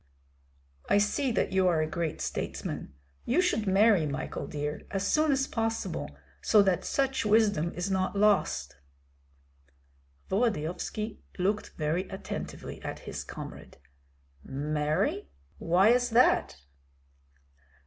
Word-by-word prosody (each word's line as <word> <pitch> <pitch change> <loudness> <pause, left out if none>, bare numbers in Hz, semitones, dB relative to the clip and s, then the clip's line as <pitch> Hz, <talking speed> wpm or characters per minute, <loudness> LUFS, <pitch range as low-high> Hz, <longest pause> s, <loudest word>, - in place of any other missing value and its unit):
"I - - +5
see 210 +6 +1
that - - 0
you 190 -1 +3
are 170 -3 +3
a - - -2
great 160 0 -3
statesman. 70 - -4 0.3
You 255 - +1
should 290 - +1
marry, 195 -4 +4
Michael 145 +2 -4
dear, 150 0 -4
as 195 0 -2
soon 310 +6 +3
as 270 0 +2
possible, 225 - -3 0.2
so 210 -2 +5
that 190 -3 +1
such 270 -1 0
wisdom 210 -6 +3
is 180 +2 -2
not 190 +1 0
lost." 200 - +2 1.5
Volodyovski 210 +1 -1 0.2
looked 200 +3 -1
very 165 +4 -1
attentively 190 - -6
at - - -6
his - - -5
comrade. - - -9 0.7
"Marry, 150 - -1 0.3
why 180 +5 +4
is 245 0 +3
that?" 235 - +3
195 Hz, 120 wpm, -29 LUFS, 160-225 Hz, 1.5 s, I